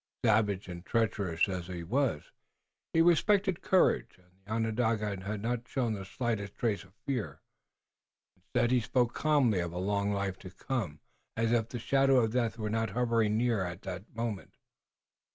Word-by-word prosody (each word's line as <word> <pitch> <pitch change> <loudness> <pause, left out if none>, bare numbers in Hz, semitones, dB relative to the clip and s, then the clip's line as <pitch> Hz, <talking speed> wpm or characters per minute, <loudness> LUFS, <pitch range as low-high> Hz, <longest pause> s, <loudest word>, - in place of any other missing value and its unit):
Savage 105 -3 +2
and 85 -1 -7
treacherous 100 -7 +1
as 90 -3 -4
he 90 -2 -5
was, 115 - -1 0.6
he 165 - +4
respected 190 +2 +3
courage, 190 -2 +2
and 90 -1 -27
the 100 - -12
Onondaga 110 -3 0
had 105 +1 -4
not 120 +1 -2
shown 120 -4 -1
the 100 -2 -5
slightest 105 -2 -3
trace 110 -4 -1
of 95 - -21
fear. 130 -6 -3 1.0
Instead, 120 - 0
he 130 - +4
spoke 120 +1 +1
calmly 140 -10 +3
of 85 -1 -2
a - - -5
long 100 +2 0
life 100 -1 -2
to 95 - -9
come, 95 - -4 0.4
as 115 0 +1
if 115 -1 +1
the 120 - -4
shadow 135 +3 +3
of 110 -2 +1
death 120 -2 0
were 105 -1 -3
not 115 -1 0
hovering 115 -1 +1
near 115 -4 +1
at 90 +1 -6
that 95 +2 -7
moment. 115 -4 -4
110 Hz, 170 wpm, -31 LUFS, 100-120 Hz, 1.0 s, he